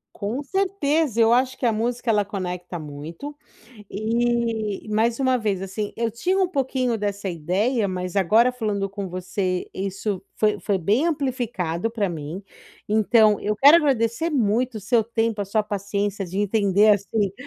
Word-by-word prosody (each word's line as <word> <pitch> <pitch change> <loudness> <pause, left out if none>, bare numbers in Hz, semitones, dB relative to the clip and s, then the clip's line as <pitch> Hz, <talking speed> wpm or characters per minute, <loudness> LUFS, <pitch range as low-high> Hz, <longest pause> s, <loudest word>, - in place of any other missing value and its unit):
Com 225 +7 -3
certeza. 315 - 0
Eu 225 +1 +5
acho 255 +2 +2
que - - -3
a 230 - +4
música, 235 +2 -2
ela 210 -2 +3
conecta 180 -3 -5
muito, 155 - -8 0.6
e 225 -1 -1
mais 225 +3 +1
uma 260 -1 +2
vez, 205 -4 -1
assim, 205 +2 -4
eu 230 0 0
tinha 360 - -1
um 375 - +3
pouquinho 260 -6 -1
dessa 200 -1 -3
ideia, 200 - 0
mas 180 0 -4
agora 220 +6 +4
falando 210 -5 -2
com 200 -1 -5
você 185 0 -3
isso 195 0 -3
foi 210 -2 +1
foi 195 +2 0
bem 210 - +1
amplificado 240 - -2
pra 215 -4 -1
mim. 160 +3 -6 0.5
Então 215 0 +4
eu 210 0 -1
quero 285 +7 +8
agradecer 265 -1 +1
muito 240 -1 +1
o 215 - -5
seu 225 +3 +2
tempo, 225 -1 -1
a 200 - -1
sua 215 +2 +1
paciência 200 -1 -2
de 185 +3 -5
entender, 205 0 +3
assim, 200 0 -1
215 Hz, 160 wpm, -23 LUFS, 195-240 Hz, 0.6 s, quero